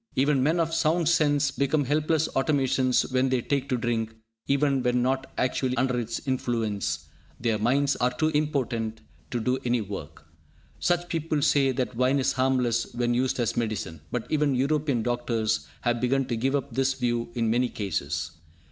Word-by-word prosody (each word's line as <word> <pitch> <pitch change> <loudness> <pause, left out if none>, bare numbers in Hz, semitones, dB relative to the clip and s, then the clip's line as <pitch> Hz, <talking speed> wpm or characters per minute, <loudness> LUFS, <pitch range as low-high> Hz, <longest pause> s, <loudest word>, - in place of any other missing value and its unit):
Even 140 0 +3
men 160 +6 +2
of 165 -1 0
sound 165 0 +2
sense 145 -4 +3
become 140 +2 +1
helpless 155 +3 +1
automatons 135 -2 +2
when 130 +1 +2
they 130 -1 +2
take 140 +2 -1
to 130 - +1
drink; 115 -2 -2 0.3
even 140 -1 +2
when 125 0 +1
not 130 +1 -1
actually 130 0 0
under 125 0 +1
its 115 -1 -3
influence, 110 - -1 0.3
their 115 -2 0
minds 135 +5 +2
are 125 - +2
too 155 +5 0
impotent 130 -7 -1 0.3
to 120 - -2
do 125 +3 0
any 125 0 +1
work. 85 -8 -7 0.5
Some 175 0 +1
people 160 -4 -1
say 135 -2 +4
that 125 -1 -2
wine 130 +3 +2
is 135 - +1
harmless 125 -3 +1
when 120 0 +1
used 130 +1 0
as 120 -3 0
medicine, 110 -9 -3
but 125 -2 -3
even 150 -3 +2
European 140 -2 +1
doctors 115 -8 -1
have 120 -1 0
begun 135 +2 +2
to 120 - 0
give 135 +5 0
up 135 -4 -3
this 135 +1 +1
view 120 -2 -1
in 115 -2 +1
many 125 +1 +2
cases. 75 -5 -3
130 Hz, 175 wpm, -26 LUFS, 115-140 Hz, 0.5 s, say